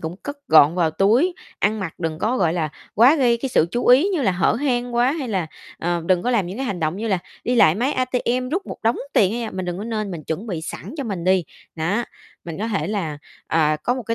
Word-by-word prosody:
cũng 160 +3 -5
cất 285 +7 -7
gọn 155 +1 +7
vào 170 -3 +2
túi, 235 - +2 0.2
ăn 215 +1 +1
mặc 175 -5 -4
đừng 160 -2 -3
có, 230 +8 0
gọi 170 -6 +2
là, 165 -3 -1 0.3
quá 250 +9 +6
gây 245 -4 +3
cái 260 +3 -3
sự 165 - +3
chú 240 - -2
ý 265 +10 +6
như 360 -7 0
là 195 -6 +2
hở 180 -1 +2
hang 245 -1 -1
quá, 245 +3 +3
hay 290 -6 -4
là, 185 -6 -1 0.3
ờ, 170 0 -1
đừng 180 -2 +2
có 245 - 0
làm 210 -8 +1
những 190 +4 -6
cái 270 - -3
hành 195 -5 -3
động 155 +3 -1
như 225 +2 -3
là 190 -3 +1 0.3
đi 245 - +1
lại 165 -9 +5
máy 255 +7 0
ATM 255 0 -1
rút 375 +5 -2
một - - -7
đống 230 +2 +2 0.2
tiền, 195 -1 +3
hay 235 +1 -3
là 220 - -4
mình 185 0 -4
đừng 180 +1 -4
có 210 - -5
nên 215 -3 -3
mình 165 -3 -6
chuẩn 170 +8 -4
bị 175 -7 -3
sẵn 190 - -7
cho 280 - -3
mình 190 -7 -4
đi, 185 -1 +3 0.3
đó. 175 +9 -1 0.4
Mình 165 -1 -6
có 220 +3 -2
thể 210 -3 -1
là, 175 -8 -3 0.3
à, 155 -1 +2
có 245 +10 -1
một 255 - -5
cái 230 +1 -2
210 Hz, 270 wpm, -22 LUFS, 175-245 Hz, 0.4 s, gọn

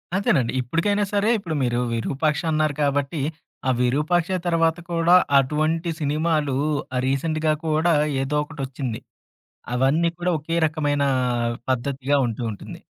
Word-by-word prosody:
అంతేనండి. 145 -11 +1
ఇప్పటికైనా 170 +11 0
సరే 205 +2 +2
ఇప్పుడు 170 -6 -4
మీరు 120 -1 0
'విరూపాక్ష' 150 +7 -1
అన్నారు 155 -1 +1
కాబట్టి, 145 +1 0 0.5
ఆ - - +3
'విరూపాక్ష' 160 +8 +1
తర్వాత 165 -1 +2
కూడా 170 +1 +4 0.2
అటువంటి 155 +5 0
సినిమాలు 150 -1 0 0.4
ఆ 125 - +1
రీసెంట్‌గా 155 +3 0
కూడా 160 +2 +2 0.3
ఏదో 150 +2 -1
ఒకటి 150 -1 -9
ఒచ్చింది. 125 -4 -5 0.7
అవన్నీ 140 +7 +2
కూడా 175 +1 0
ఒకే 165 +3 -3
రకమైన 145 -2 -1 0.7
పద్ధతిగా 135 +2 0
ఉంటూ 115 +1 -4
ఉంటుంది. 105 - -9
150 Hz, 125 wpm, -23 LUFS, 135-165 Hz, 0.7 s, కూడా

